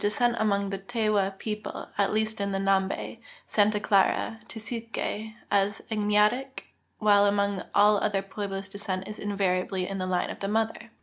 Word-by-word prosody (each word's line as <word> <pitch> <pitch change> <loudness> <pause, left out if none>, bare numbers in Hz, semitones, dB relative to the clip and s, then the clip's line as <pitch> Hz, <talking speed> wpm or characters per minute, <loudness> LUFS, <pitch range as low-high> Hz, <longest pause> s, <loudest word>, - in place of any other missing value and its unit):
scent 240 +2 +1
among 200 -2 +1
the 195 - -3
Tewa 205 -2 0
people, 210 0 -5
at 200 -1 +2
least 220 0 -1
in 200 0 -1
Xambe, 195 +3 0 0.3
Santa 210 0 +2
,;..Clara, 205 +2 +2
and 225 - -24
Tesuque, 230 0 -6 0.5
is 200 +1 +2
agnatic, 210 +5 +1 0.3
while 205 -1 +5
among 200 -1 +1
all 205 +1 +6
other 195 -2 0
^meblos 195 0 -5
descent 195 -2 -4
is 210 - -7
invariably 190 -2 0
in 195 0 -4
the 185 - -2
line 180 -1 0
of - - -8
the 195 - -2
mother. 220 +2 -1
205 Hz, 160 wpm, -27 LUFS, 195-215 Hz, 0.5 s, all